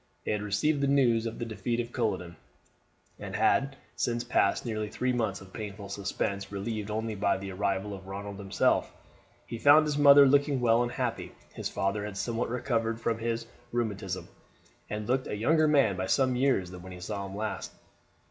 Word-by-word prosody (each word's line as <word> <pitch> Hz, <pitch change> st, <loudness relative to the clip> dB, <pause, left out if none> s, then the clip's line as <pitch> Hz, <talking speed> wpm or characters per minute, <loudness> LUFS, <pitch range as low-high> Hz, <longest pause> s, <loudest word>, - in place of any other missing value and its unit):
They -, -, -1 dB
had 105 Hz, -1 st, 0 dB
received 120 Hz, +9 st, +1 dB
the 140 Hz, -, +2 dB
news 120 Hz, -5 st, +3 dB
of 115 Hz, -, -6 dB
the 120 Hz, -, -3 dB
defeat 115 Hz, +1 st, -2 dB
at 120 Hz, 0 st, -4 dB
Culloden, 95 Hz, -7 st, -2 dB, 0.8 s
and -, -, -6 dB
had 135 Hz, 0 st, +2 dB, 0.2 s
since 120 Hz, 0 st, -1 dB
passed 120 Hz, -3 st, +1 dB
nearly 110 Hz, -2 st, -2 dB
three 125 Hz, +4 st, -1 dB
months 110 Hz, -5 st, -1 dB
of 95 Hz, 0 st, -14 dB
painful 100 Hz, -2 st, -7 dB
suspense, 100 Hz, 0 st, -3 dB
relieved 105 Hz, +1 st, -4 dB
only 110 Hz, +1 st, -2 dB
by 100 Hz, -1 st, +1 dB
the 95 Hz, 0 st, -6 dB
arrival 100 Hz, +1 st, -1 dB
of 95 Hz, -1 st, -9 dB
Ronald 100 Hz, +1 st, -6 dB
himself. 95 Hz, -1 st, +1 dB, 0.5 s
He 115 Hz, -, -6 dB
found 150 Hz, +4 st, +7 dB
his 150 Hz, -1 st, -1 dB
mother 140 Hz, -1 st, +9 dB
looking 140 Hz, 0 st, +3 dB
well 115 Hz, -1 st, +4 dB
and 120 Hz, 0 st, -1 dB
happy; -, -, -3 dB, 0.2 s
his -, -, -4 dB
father 100 Hz, +2 st, -1 dB
had 105 Hz, -1 st, -6 dB
somewhat 115 Hz, +2 st, -2 dB
recovered 115 Hz, -2 st, -1 dB
from 115 Hz, -1 st, -1 dB
his 115 Hz, 0 st, -2 dB, 0.3 s
rheumatism, 100 Hz, -6 st, -3 dB, 0.6 s
and 105 Hz, 0 st, -4 dB
looked 130 Hz, +1 st, 0 dB
a 105 Hz, -, -3 dB
younger 155 Hz, +8 st, +3 dB
man 140 Hz, -10 st, +4 dB
by 95 Hz, +1 st, -2 dB
some 130 Hz, +5 st, +2 dB
years 125 Hz, -9 st, +1 dB
than 90 Hz, -1 st, -9 dB
when 95 Hz, +1 st, -9 dB
he 90 Hz, -, -9 dB
saw 100 Hz, +2 st, -4 dB
him 95 Hz, -, -8 dB
last. 110 Hz, 0 st, -4 dB
110 Hz, 190 wpm, -29 LUFS, 100-125 Hz, 0.8 s, mother